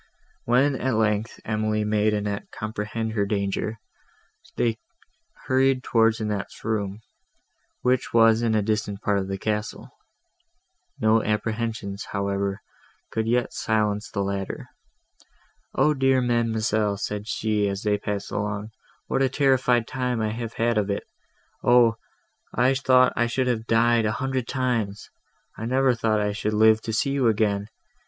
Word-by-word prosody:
When, 130 +4 +3
at 130 -3 0
length, 110 0 0
Emily 110 0 0
made 105 0 +2
Annette 105 -1 -2
comprehend 110 +1 -4
her 105 -2 0
danger, 100 +1 -2 0.8
they 115 -2 +1 0.7
hurried 130 0 +2
towards 115 -1 +3
Annette's 105 -2 -4
room, 105 -2 -2 0.8
which 125 0 +1
was 115 0 +5
in 115 -2 +1
a 105 - +2
distant 105 -1 -1
part 100 -1 +2
of 95 - -3
the 95 0 -3
castle. 105 +1 -3 1.1
No 110 +1 +3
apprehensions, 110 -2 -2
however, 100 0 -1 0.5
could 110 0 -1
yet 120 +1 +1
silence 105 -1 0
the 100 - -2
latter. 100 0 -4 1.1
"Oh 150 +3 +4
dear 135 -1 +3
ma'amselle," 110 -4 +1
said 105 +1 -4
she, 105 -2 0
as 100 0 -4
they 105 -1 +1
passed 100 -1 -4
along, 105 +1 -3 0.3
"what - - -1
a 135 - +3
terrified 130 -3 +2
time 125 -3 -2
have 115 +1 -3
I - - -2
had 115 -2 +2
of 105 -1 -1
it! 100 - -2 0.6
Oh! 120 -2 +5 0.6
I 125 +3 +3
thought 130 -2 +4
I 120 - +2
should 130 +2 0
have 115 -3 -1
died 115 0 +3
a 105 - 0
hundred 130 -2 -2
times! 120 -6 -2 0.5
I 115 - -3
never 130 +1 +3
thought 110 -2 +1
I 105 0 0
should 105 +1 -2
live 110 +1 +5
to 110 - -4
see 115 +5 0
you 135 -3 +2
again! 105 -2 +1
110 Hz, 145 wpm, -25 LUFS, 105-120 Hz, 1.1 s, was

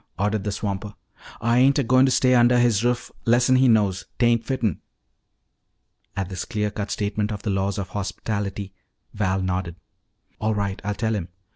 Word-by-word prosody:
ordered 105 +2 0
the 105 - -2
swamper. 100 0 -4 0.5
"Ah 115 0 +1
ain't 130 +4 +4
a 140 - +2
goin' 130 +2 +4
to - - +2
stay 130 0 +3
undah 120 0 +5
his 120 -3 +3
ruff 120 -1 -1
lessen 120 +2 +4
he 130 0 +4
knows. 100 -5 +2
'Tain't 120 -1 +3
fitten." 115 - -1 1.4
At 95 -2 -1
this 95 -2 -4
clean 105 -1 -2
cut 105 0 -4
statement 105 0 -2
of 100 -1 -5
the 105 - -1
laws 95 +1 -1
of 100 -2 -4
hospitality, 100 0 -4 0.4
Val 95 -2 0
nodded. 90 -2 -2 0.6
"All 110 0 0
right. 100 -2 -2
I'll 105 +1 -2
tell 110 +2 -1
him. 95 -6 -3
105 Hz, 175 wpm, -23 LUFS, 100-120 Hz, 1.4 s, undah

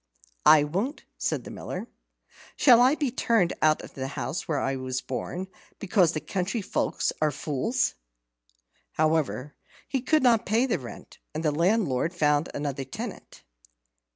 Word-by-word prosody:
"I 155 -1 +8
won't," 195 - -2 0.2
said - - -1
the - - -9
Miller. - - -6 0.7
"Shall 245 -4 +6
I 260 +4 +5
be 290 -5 -1
turned 230 -8 +2
out 155 0 +3
of - - -11
the 130 -1 -4
house 135 +3 -4
where 155 - 0
I 135 0 -1
was 130 -1 -3
born, 175 +9 -4 0.3
because 185 -4 +2
the 155 - -1
country 195 +6 -2
folk - - -2 0.2
are 155 - +4
fools?" 150 - -1 1.0
However, 155 -3 0 0.3
he 265 -1 -1
could 305 +3 +2
not 235 -3 +4
pay 225 +5 +2
the 245 - 0
rent, 125 -3 -11 0.2
and 160 +1 -3
the 150 - +3
landlord 170 - +1
found 150 -1 +2
another 140 -1 -3
tenant. 130 - -8
165 Hz, 155 wpm, -27 LUFS, 145-225 Hz, 1.0 s, I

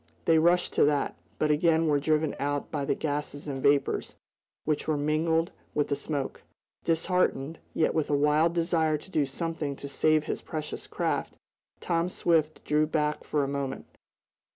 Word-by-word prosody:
They 160 -1 +5
rushed 175 +2 +3
to - - +4
that, 145 -1 +1 0.2
but 150 - +2
again 160 +1 +3
were 145 -2 +3
driven 155 +1 +1
out 145 0 -2
by 145 -3 -2
the - - +1
gases 145 -1 -3
and 135 -2 -4
vapors, 140 +1 +1 0.5
which 155 -1 -1
were 155 -2 +1
mingled 160 +3 +1 0.2
with 145 - +1
the 140 - +1
smoke. 140 -2 -4 0.4
Disheartened, 165 -3 0 0.2
yet 160 - +2
with 160 -2 0
a 145 - +3
wild 150 +4 +3
desire 165 -2 +2
to 190 - -15
do 150 -5 +1
something 150 0 -3
to 140 - -8
save 155 +2 +2
his - - -3
precious 155 -1 -5
craft, - - -2 0.4
Tom 170 0 0
Swift 160 -4 +1
drew 150 +1 +2
back 150 -1 0
for 150 -2 0
a - - -1
moment. 140 -1 -3
155 Hz, 170 wpm, -28 LUFS, 145-160 Hz, 0.5 s, They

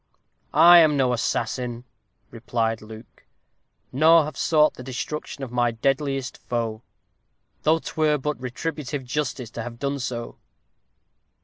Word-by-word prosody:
"I 175 0 +9
am 155 -3 +4
no 130 -2 +2
assassin," 120 0 -2 0.5
replied 115 -1 -2
Luke, 110 +2 -13 0.7
"nor 160 +4 +5
have 150 -1 -7
sought 155 +2 +3
the - - -11
destruction 135 +3 -5
of 130 - -6
my 120 -1 +2
deadliest 135 +3 -1
foe 115 -2 -3 0.8
though 160 +1 +3
'twere 155 -2 0
but 150 0 -4
retributive 140 +1 -4
justice 130 -3 -3
to 115 - -6
have 115 0 -7
done 140 +2 -2
so." 120 -2 -5
130 Hz, 125 wpm, -24 LUFS, 120-150 Hz, 0.8 s, I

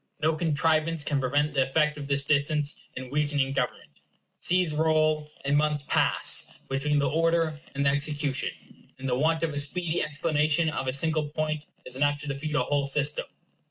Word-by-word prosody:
No 160 +1 +1
contrivance 160 0 +1
can 145 -2 0
prevent 145 +3 0
the 135 - +2
effect 150 +3 +1
of 145 -2 -7
this 140 0 +2
distance 145 +1 +1 0.2
in 130 0 -7
weakening 145 -2 0
government. 100 - -4 0.4
Seas 180 -3 +3
roll, 155 -1 +1 0.2
and 140 +1 +2
months 150 -1 +1
pass, - - +2 0.2
between 145 +2 0
the 140 -1 +2
order 165 +1 +1
and 140 0 0
the 140 - +4
execution, 145 -1 0 0.5
and 135 0 -5
the 125 - 0
want 160 +4 +1
of 160 -2 -1
a 145 - -1
speedy 165 +3 -1
explanation 155 +1 +1
of 135 -3 -3
a - - +1
single 155 +1 +1
point 155 0 -3 0.2
is 130 0 -2
enough 145 +1 +1
to 150 - -6
defeat 145 +2 -3
a 130 - +2
whole 140 +1 0
system. 145 +1 +1
150 Hz, 180 wpm, -27 LUFS, 140-155 Hz, 0.5 s, the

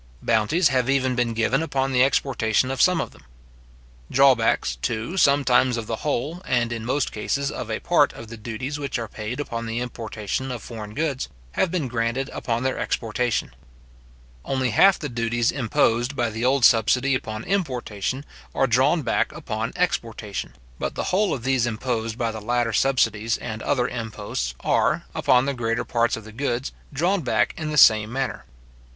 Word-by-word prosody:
Bounties 145 +10 +3
have 130 -2 +1
even 130 -2 +2
been 120 -2 0
given 115 +6 +1
upon 135 -4 -1
the 125 -1 +4
exportation 130 -2 +1
of 135 - -1
some 180 -1 +4
of - - -3
them. - - -19 0.9
Drawbacks, 125 - +3
too, 115 - -3
sometimes 135 -6 +4
of 115 - -4
the 110 0 -3
whole, 150 +6 -2
and, 120 -2 0
in 115 -1 -5
most 130 +3 0
cases, 140 +6 -2
of - - -6
a - - -2
part - - +3
of 115 - -10
the 115 - -8
duties 120 +6 -5
which 140 -3 -3
are 115 -1 -4
paid 110 +6 -6
upon 115 -5 -4
the 115 +1 -3
importation 115 +1 -4
of 120 -3 -6
foreign 110 -3 -8
goods, 145 -4 -1 0.2
have 185 - +1
been 165 -6 -1
granted 120 +3 -2
upon 120 0 -2
their 130 - -1
exportation. 120 +1 -1 0.9
Only 130 -3 -1
half 195 - +6
the 150 - -4
duties 120 -1 0
imposed 120 0 +1
by 120 -3 0
the 110 +2 -4
old 130 0 +4
subsidy 125 +4 +4
upon 110 -4 -3
importation, 130 - -2 0.3
are 135 - +3
drawn 135 +6 +3
back - - +1
upon 110 +2 -4
exportation; 115 - -2 0.2
but - - -3
the - - -3
whole 205 +2 +3
of 120 - -3
those 130 -2 +2
imposed 115 -1 -2
by 115 -2 -1
the 110 -1 -7
latter 120 +1 0
subsidies 115 -3 +2
and 110 -2 -6
other 125 -3 +1
imposts 105 - -4
are, - - +1
upon 125 +1 +3
the 140 - 0
greater 115 -1 -1
parts 120 -1 +1
of 115 - -9
the 110 - -11
goods, 125 +1 -2 0.2
drawn 175 +7 +1
back - - +1
in 155 -2 -4
the 150 - -2
same 110 -4 +6
manner. 135 0 -3
125 Hz, 180 wpm, -24 LUFS, 115-135 Hz, 0.9 s, half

